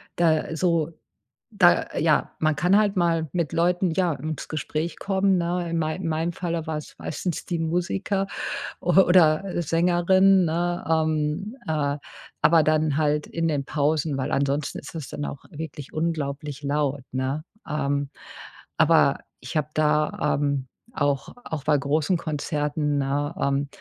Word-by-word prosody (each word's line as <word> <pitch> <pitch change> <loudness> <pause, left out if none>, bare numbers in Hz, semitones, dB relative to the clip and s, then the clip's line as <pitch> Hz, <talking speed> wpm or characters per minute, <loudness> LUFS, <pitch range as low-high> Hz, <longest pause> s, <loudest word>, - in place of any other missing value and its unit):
da 160 -2 +2
so 170 -2 +1 0.6
da - - +4
ja - - +2
man 155 -1 +2
kann 180 +4 +3
halt 205 -2 +2
mal 165 -3 +1
mit 170 -5 -1
Leuten, 175 +2 +2
ja, 175 0 +1
ins 155 +3 -5
Gespräch 155 +1 -3
kommen, 195 -1 +2
ne? 175 0 -1
In 170 - 0
mei 155 0 -1
meinem 165 -1 -1
Falle 170 -2 -3
war 160 -1 -2
es 150 - -10
meistens 170 +2 -4
die 175 -2 -2
Musiker 180 +4 -1 0.6
o - - +1
oder 175 -3 +5 0.2
Sängerin, 180 +3 +4
ne? 175 +2 -1
Ähm, 160 - 0
äh, 145 -2 0 0.4
aber 165 -1 +5
dann 155 -1 +2
halt 150 -1 +1
in 165 0 -1
den 145 -3 -1
Pausen, 150 0 0
weil 130 - -2
ansonsten 140 +1 0
ist - - -11
das 155 -4 -6
dann 145 - -4
auch 140 - -7
wirklich 150 -3 -7
unglaublich 150 -3 -3
laut, 140 -1 -1
ne? 130 +4 -2 0.3
Ähm, 140 -1 -1 0.7
aber - - +4 0.2
ich - - -4
habe 150 -1 0
da, 150 -1 +1
ähm, 140 -2 -1 0.3
auch 140 -2 -1
auch 155 -4 -4
bei 150 -1 +4
großen 145 +5 +1
Konzerten, 150 -1 -1
ne? 145 +3 -1
Ähm, 140 +1 +1
155 Hz, 150 wpm, -25 LUFS, 145-170 Hz, 0.7 s, oder